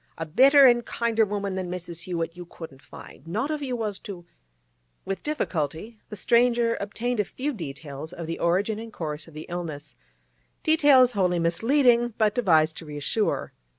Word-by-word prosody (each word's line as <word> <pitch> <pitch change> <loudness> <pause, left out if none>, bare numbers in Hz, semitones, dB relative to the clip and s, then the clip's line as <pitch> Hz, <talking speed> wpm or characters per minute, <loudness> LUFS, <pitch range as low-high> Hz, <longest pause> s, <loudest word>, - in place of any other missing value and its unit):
A 165 - -4
better 270 - +6
an' 240 -2 +6
kinder 230 -1 0
woman 200 -1 -3
than 185 -1 -4
Mrs. 175 -2 -5
Hewett 170 -2 -3
you 175 -1 -10
wouldn't 155 -5 -10
find, - - -13
not 220 - -2
if 305 -1 -3
you 260 -3 -2
was 215 -4 -3
to—' 180 -4 -9 0.8
With 195 - -4
difficulty 210 - -3
the 210 - -7
stranger 235 +2 +2
obtained 230 +4 -3
a - - +4
few 275 +9 -4
details 150 - -7
of 170 -2 -7
the 165 +1 -5
origin 195 +5 +1
and 225 0 -8
course 155 -5 -5
of 165 - -16
the 155 - -7
illness—details 155 - 0
wholly 185 -5 +1
misleading, 235 - +2
but 215 -2 +2
devised 160 -9 +3
to - - -8
reassure. 150 +9 -2
190 Hz, 165 wpm, -25 LUFS, 165-235 Hz, 0.8 s, better